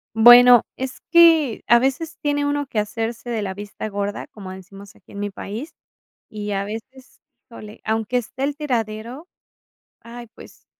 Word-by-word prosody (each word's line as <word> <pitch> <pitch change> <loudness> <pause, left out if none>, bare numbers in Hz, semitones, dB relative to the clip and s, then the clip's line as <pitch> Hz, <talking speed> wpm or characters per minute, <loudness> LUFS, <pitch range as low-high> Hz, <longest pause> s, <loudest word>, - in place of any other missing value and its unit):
Bueno, 240 +1 +8
es 260 0 -6
que 325 -8 +5
a 235 - +6
veces 270 +5 -2
tiene 290 -1 0
uno 290 0 -1
que 235 - -5
hacerse 225 +3 -3
de 225 -3 -2
la 190 -2 -4
vista 205 +2 -7
gorda, 200 0 -4
como 195 -3 -11
decimos 195 +2 -13
aquí, - - -20
en 200 - -7
mi 205 0 -3
país. 215 +9 -8 0.5
Y 210 -2 -6
a 195 0 -1
veces, 240 +5 -10 0.3
híjole, 215 -2 -12
aunque 220 +2 -1
esté 245 +3 -5
el 285 +1 -1
tiradero, 245 - -4 0.7
ay, 235 +1 -11
pues, - - -16
230 Hz, 160 wpm, -21 LUFS, 210-265 Hz, 0.7 s, Bueno